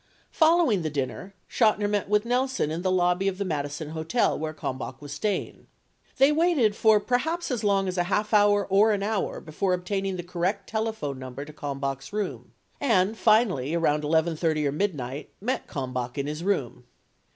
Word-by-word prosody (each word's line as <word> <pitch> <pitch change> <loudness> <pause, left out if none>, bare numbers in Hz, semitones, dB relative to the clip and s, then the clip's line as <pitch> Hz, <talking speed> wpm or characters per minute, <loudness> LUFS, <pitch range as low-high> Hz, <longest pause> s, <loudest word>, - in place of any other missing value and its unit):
Following 320 - +4
the 160 - -2
dinner, 140 - -4
Chotiner 215 -3 +2
met 205 -1 -1
with 210 +1 +2
Nelson 250 - 0
in 165 +2 -3
the 185 - 0
lobby 180 +1 +2
of 190 -1 -1
the 200 - -2
Madison 145 -2 -3
Hotel, 160 +9 0
where 155 0 -3
Kalmbach 130 -3 -5
was 145 -1 -9
staying. 200 +7 -3 0.5
They 270 +2 +6
waited 300 -9 +2
for 220 -1 +5
per 245 +4 +1
haps 335 +2 -3
as 235 -3 -2
long 195 -2 +2
as 185 0 -2
a 175 - +2
half 210 +4 -1
hour 205 -1 +4
or 205 +3 +4
an 200 -1 -1
hour 215 -1 -1
before 180 +4 -1
obtaining 195 +1 -2
the 175 - -5
correct 180 +3 -2
telephone 220 -11 -3
number 130 +2 -7
to 155 - -11
Kalmbach's 140 -2 -4
room 210 -1 -4 0.3
and, 215 -5 +2
finally 215 - +2
around 150 -3 +1
11 160 +2 +1
:30 155 -2 0
or - - 0
midnight, 145 -5 -3
met 250 +6 -2
Kalmbach 125 -1 -4
in 140 - -1
his 150 +3 -4
room. 145 -11 -1
185 Hz, 185 wpm, -26 LUFS, 150-215 Hz, 0.5 s, They